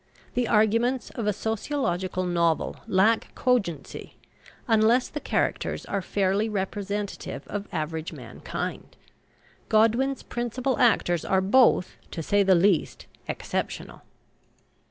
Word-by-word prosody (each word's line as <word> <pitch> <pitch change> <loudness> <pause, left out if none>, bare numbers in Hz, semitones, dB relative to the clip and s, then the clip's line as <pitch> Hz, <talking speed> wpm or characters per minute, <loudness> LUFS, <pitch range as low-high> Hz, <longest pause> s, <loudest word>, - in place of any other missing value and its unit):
The 245 -1 0
arguments 230 +4 +2
of 225 -3 -4
a - - +4
sociological 200 -4 -2
novel 170 -2 0
lack 215 +2 +2
cogency 205 - -1 0.5
unless 225 +2 +4
the 295 - -5
characters - - -1
are 200 - -2
fairly 200 +3 0
representative 200 0 -4
of 205 0 -5
average 160 0 -3
mankind. - - -6 0.7
Godwin's 230 +5 +2
principal 245 +2 -2
actors 175 -8 +3
are 190 - +2
both, 195 -1 +3
to 165 - -5
say 205 +5 +2
the 190 -1 +5
least, 175 -2 +2 0.2
exceptional. - - -4
205 Hz, 110 wpm, -26 LUFS, 185-235 Hz, 0.7 s, the